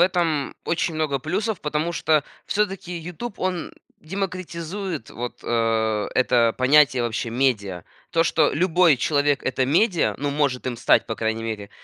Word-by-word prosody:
этом 170 -5 +1
очень 170 0 -1
много 155 -3 0
плюсов, 195 - -2
потому 150 +3 -1
что 155 -2 +2 0.2
всё-таки 195 -3 -1
"Ютуб" 180 +7 -7
он 185 -2 -2 0.3
демократизирует 185 - -4
вот, 120 +1 -6
а, 110 -2 0
это 120 -3 +3
понятие 130 -1 +5
вообще 115 0 -2
медиа. 110 -8 0 0.3
То, 165 - +3
что 160 - +3
любой 175 -2 +4
человек- 145 +1 +1
это 130 0 0
медиа, 175 - +2
ну, 145 0 -1
может 140 -4 0
им 125 -2 -2
стать, 120 - +3
по 110 - -3
крайней 110 0 -2
мере, 105 -3 -5
150 Hz, 145 wpm, -23 LUFS, 120-175 Hz, 0.3 s, понятие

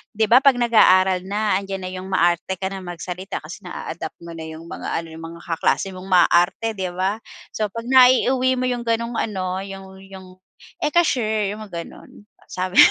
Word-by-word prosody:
'di 220 +1 +2
ba, 240 +5 +6
kapag 275 -2 +5
nag-aaral 190 -6 +4
na 205 -1 +1
andiyan 195 -1 -5
na 185 - -5
'yong 185 0 -7
maarte 175 0 +1
ka 190 - -4
nang 195 - -6
magsalita 180 +2 -6
kasi 175 +6 -9
naa-adapt 165 -1 -6
mo 170 - -8
na 165 - -8
iyong 160 +1 -10
mga 170 - -7
ano 165 - -11
iyong 165 0 -9
mga - - -14
kaklase 190 +3 0
mong 185 +1 -10
maaarte, 180 +4 +3
'di 190 -3 -3
ba? 195 +4 -1 0.3
So, 215 -1 -1
kapag 230 +3 -7
naiuwi 255 0 +4
mo 255 - -1
iyong 245 -1 -1
ganong 230 +1 0
ano 185 -3 -2
iyong 195 -1 -10
iyong, 190 -1 -12 0.5
"Eka 340 +3 +3
sure" 220 -7 0
iyong 210 +1 -7
mga 170 -3 -6
ganoon 205 - -15 0.2
sabi 185 +1 -3
195 Hz, 190 wpm, -21 LUFS, 185-225 Hz, 0.5 s, ba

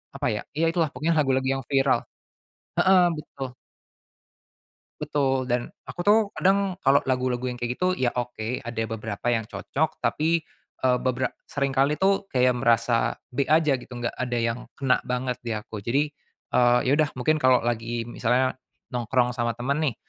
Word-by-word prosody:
apa - - -1
ya, 105 - -3 0.2
iya 165 - +3
itulah 165 -3 +1
pokoknya 155 +6 0
lagu-lagu 130 -2 +2
yang - - -8
viral, 135 -1 +3 0.9
heeh, 185 -2 +6
betul. 140 -3 -6 1.5
Betul, 135 -2 +1
dan 120 0 0 0.2
aku 130 +7 -10
tuh 210 +2 +7 0.2
kadang 195 -1 +2
kalau 140 -1 +4
lagu-lagu 125 -1 -1
yang 120 - -8
kayak 120 +1 -2
gitu, 185 0 +1
ya 125 -1 +1
oke, 120 0 -3
ada 115 -1 -3
beberapa 110 0 -5
yang 115 -2 +2
cocok. 155 +7 -3
Tapi, 165 +2 +1 0.5
eee, 125 0 +4
beberap 130 0 -1
seringkali 140 +1 0
tuh 195 +1 +3
kayak 125 -1 +3
merasa 120 -1 +2
B 135 +2 -1
aja 155 -1 +3
gitu, 125 - -10
enggak 120 -1 -4
ada 125 -1 -2
yang 115 +1 -1 0.2
kena 130 -2 +2
banget 125 0 -2
di 115 - -3
aku. 105 -1 -5
Jadi, 140 +7 +1 0.5
eee, 120 0 +5
iya - - +3
udah, 155 -2 +2
mungkin 155 +5 +2
kalau 130 -3 +4
lagi 115 0 -2
misalnya 125 +2 +1 0.3
nongkrong 125 0 0
sama 120 -1 0
temen 125 +4 -2 0.2
nih, - - -14
125 Hz, 165 wpm, -25 LUFS, 120-140 Hz, 1.5 s, tuh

